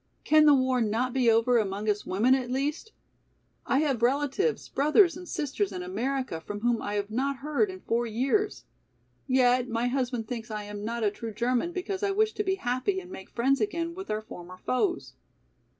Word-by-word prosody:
Can 310 0 +5
the 290 - +8
war 260 -1 +2
not 230 +3 0
be 255 -3 +3
over 230 +2 +4
among 205 0 -2
us 210 -1 0
women 220 +8 +3
at 255 -2 0
least? 290 - -2 0.8
I 270 - +3
have 275 -6 0
relatives, 285 - +1
brothers 305 +6 +4
and 360 0 -9
sisters 235 -9 -2
in 180 -2 -5
America 235 0 -2
from 205 +5 -6
whom 240 0 +1
I 205 0 -3
have 205 0 -2
not 275 +5 0
heard 305 +8 +1
in 375 0 -8
four 235 +1 0
years. 270 - 0 0.6
Yet 250 -1 +3
my 235 +2 0
husband 245 -3 -2
thinks 230 -1 -5
I 210 -1 -4
am 205 0 -7
not 230 +1 -3
a 205 - +2
true 225 +2 -6
German 250 - 0
because 375 +2 -4
I 405 - +1
wish 430 +2 +2
to 420 - -2
be 385 -1 0
happy 260 +4 -1
and 365 -1 -12
make 190 - -9
friends 265 +3 +1
again 335 -5 -1
with 380 +2 -8
our 215 0 -1
former 180 -4 -10
foes." 350 - -1
255 Hz, 200 wpm, -28 LUFS, 225-305 Hz, 0.8 s, the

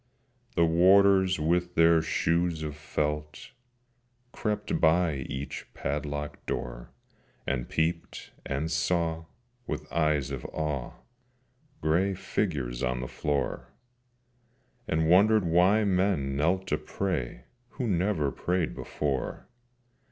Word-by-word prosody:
The 85 - +4
Warders 95 +2 +5
with 85 +3 0
their 85 0 +5
shoes 85 0 0
of 75 -1 -4
felt 75 -1 -3 0.8
Crept 105 -1 -2
by 80 -1 +3
each 70 +1 -6
padlocked 75 0 -4
door, - - -4 0.6
And 65 -3 -2
peeped 80 +1 -2
and 70 +4 -2
saw, 80 0 0 0.4
with - - -4
eyes 75 -4 +1
of 65 -3 -5
awe, 75 -5 -3 0.9
Grey 90 +6 +2
figures 70 - -2
on 60 -1 -1
the 65 - -4
floor, 70 -3 -3 1.1
And 80 0 +1
wondered 100 +4 +5
why 90 +6 +4
men 90 -8 +1
knelt 90 +6 +1
to - - +1
pray 65 -11 -3 0.3
Who 125 - -3
never 90 -7 +1
prayed 90 +1 -1
before. 70 -3 -3
80 Hz, 105 wpm, -28 LUFS, 75-90 Hz, 1.1 s, Warders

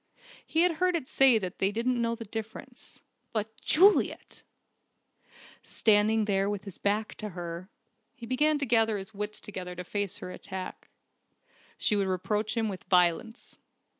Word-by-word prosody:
He 320 - +1
had 345 -2 +3
heard 365 -1 +3
it 310 -6 -3
said 260 -6 +5
that 180 - -5
they 195 +1 +2
didn't 235 +3 0
know 230 0 0
the 230 0 -8
difference. 225 +4 -8 0.3
But 220 0 -3
Juliet! 390 +6 +3 1.2
Standing 215 0 +3
there 195 -1 +1
with 205 -2 -3
his 195 -4 -8
back 210 +2 0
to 215 - -4
her, 175 0 -7 0.5
he 245 -4 -9
began 295 +5 +2
to 285 - -1
gather 225 -3 +3
his 195 +2 -7
wits 210 +1 -4
together 180 -3 -7
to 180 - -6
face 200 +1 -3
her 180 - -7
attack. 185 0 -7 0.9
She 210 - +1
would 200 -1 +1
reproach 210 +5 -1
him 225 -1 +1
with 190 -3 -6
violence. 180 +6 +1
215 Hz, 160 wpm, -29 LUFS, 195-235 Hz, 1.2 s, said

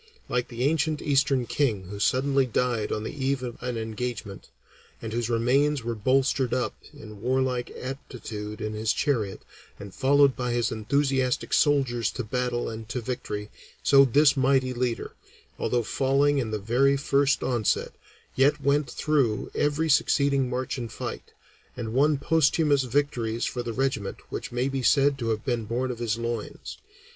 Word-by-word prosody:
Like 125 -1 -1
the 120 0 -4
ancient 155 +1 +1
Eastern 135 -3 +2
king 115 -8 0
who 100 +2 -8
suddenly 135 +4 +2
died 120 -2 0
on 105 - -2
the - - -5
eve 135 -2 -1
of 120 -2 -6
an 125 -1 -3
engagement, 110 -2 -5 0.5
and 110 -1 -6
whose 120 0 -1
remains 130 +4 +2
were 115 0 -2
bolstered 130 +3 +1
up 125 - -1 0.2
in 105 -2 -12
warlike 130 0 0
attitude 115 -5 -7
in 110 0 -3
his 110 0 0
chariot, 110 -9 -1 0.4
and 100 -2 -9
followed 140 0 +4
by 125 -1 -2
his 120 -1 0
enthusiastic 130 +3 0
soldiers 130 -6 +2
to 125 - -3
battle 120 +2 -2
and 110 0 -7
to 125 - -2
victory, 110 -4 -5 0.3
so 140 -1 +7
this 140 +3 +4
mighty 130 -1 +2
leader, 120 -1 -2 0.5
although 120 -1 0
falling 140 +4 +2
in 120 -4 -2
the 110 - -2
very 125 +7 +2
first 140 0 +2
onset, 120 -5 0 0.4
yet 145 +3 +3
went 140 -1 +1
on - - -10
through 140 -8 0
every 150 +2 +1
succeeding 140 -3 +2
march 130 +3 -3
and 115 -3 -5
fight, - - -6 0.5
and 115 -2 -4
won 145 +3 +3
posthumous 150 -1 +2
victories 120 -3 -1
for 125 - -3
the 120 -1 -4
regiment 125 -5 -2
which - - -5
may 125 +2 0
be 135 -1 -2
said 140 +2 +4
to 115 -2 -2
have 110 -1 -2
been 120 -4 -1
born 125 +4 -2
of 120 - -7
his 115 -2 -1
loins. 115 -1 -5
125 Hz, 165 wpm, -26 LUFS, 115-140 Hz, 0.5 s, so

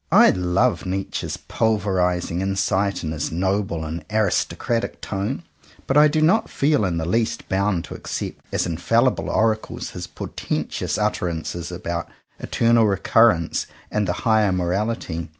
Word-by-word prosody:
I - - +7
love 95 +5 +1
Nietzsche's 95 +1 -3
pulverizing 90 -5 0
in 95 0 -1
sight 100 0 0
and 80 -1 -2
his 75 - -3
noble 95 -1 -1
and 80 +1 -5
aristocratic 110 +2 0
tone; 105 +10 -3 0.4
but 135 - 0
I 150 +1 +8
do 155 +1 +1
not 200 +8 +3
feel 140 -6 +2
in 85 -3 -1
the 80 - -2
least 110 +6 -1
bound 95 -2 +1
to - - -8
accept - - -5
as - - 0
infallible 115 +9 +1
oracles 110 0 0
his - - -6
portentous - - -3
utter 105 -4 0
ances 85 +1 -4
about 85 -1 -4 0.3
Eternal 115 -1 +3
Recurrence 100 -2 +3 0.2
and 105 -2 0
the 90 - +1
Higher 110 -3 +4
Morality. 90 -2 -2
95 Hz, 145 wpm, -22 LUFS, 90-110 Hz, 0.4 s, I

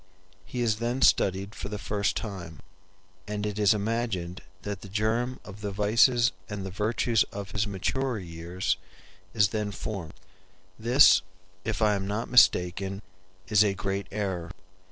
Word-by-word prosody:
He 125 - -4
is 110 -2 +1
then 120 +3 -1
studied 95 0 +3
for 100 - -6
the 105 - -4
first 105 0 -1
time, 90 -8 -6 0.7
and 105 0 -3
it 105 0 -3
is 105 0 +5
imagined 105 -5 -1 0.2
that 100 -2 -4
the 100 - -10
germ 110 +5 0
of 105 0 -10
the 105 - -2
vices 115 +4 +4 0.2
and 105 -2 -4
the 95 - -5
virtues 110 +3 +1
of 100 -1 -6
his 105 +1 0
maturer 125 +6 -1
years 85 +1 -3 0.6
is 105 -3 +4
then 105 0 -2
formed. 95 -4 -6 0.6
This, 115 -4 +6 0.4
if 110 0 -1
I 105 -1 +4
am 95 -1 -2
not 110 +4 -3
mistaken, 95 -3 +3 0.4
is 105 0 +5
a 100 -2 +1
great 100 +1 -3
error. 95 -5 -3
105 Hz, 155 wpm, -27 LUFS, 95-110 Hz, 0.7 s, This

